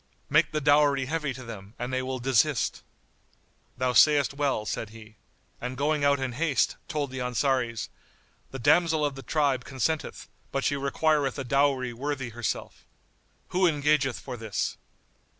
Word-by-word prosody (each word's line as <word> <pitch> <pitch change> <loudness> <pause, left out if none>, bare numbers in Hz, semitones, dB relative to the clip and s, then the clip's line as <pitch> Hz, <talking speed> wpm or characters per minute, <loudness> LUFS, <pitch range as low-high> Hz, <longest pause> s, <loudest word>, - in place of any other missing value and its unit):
"Make 155 +2 +4
the 155 - 0
dowry 145 -2 +4
heavy 150 0 -2
to 130 0 -8
them 110 -2 -10
and 125 +2 -4
they 130 - +1
will 130 0 -3
desist." 125 -2 +1 1.0
"Thou 125 0 0
sayst 145 0 +5
well," 140 -6 -1
said 110 - -3
he, 110 -1 -14 0.4
and 125 +1 -4
going 150 +1 +1
out 140 -1 +3
in 130 -1 -2
haste, 140 +1 +1
told 150 -5 -2
the 130 - -5
Ansaris, 125 -2 0 0.6
"The 135 - -7
damsel 160 +4 +3
of 145 - -1
the 135 - -9
tribe[FN#89] 140 -4 +1
consenteth; 140 +4 -3 0.2
but 135 - -1
she 145 - +1
requireth 140 0 +1
a 135 - -3
dowry 135 -1 +1
worthy 135 0 -3
herself. 120 0 -4 0.7
Who 185 0 +3
engageth 145 -4 +1
for 125 -2 -7
this?" 110 -3 -2
135 Hz, 155 wpm, -27 LUFS, 125-145 Hz, 1.0 s, sayst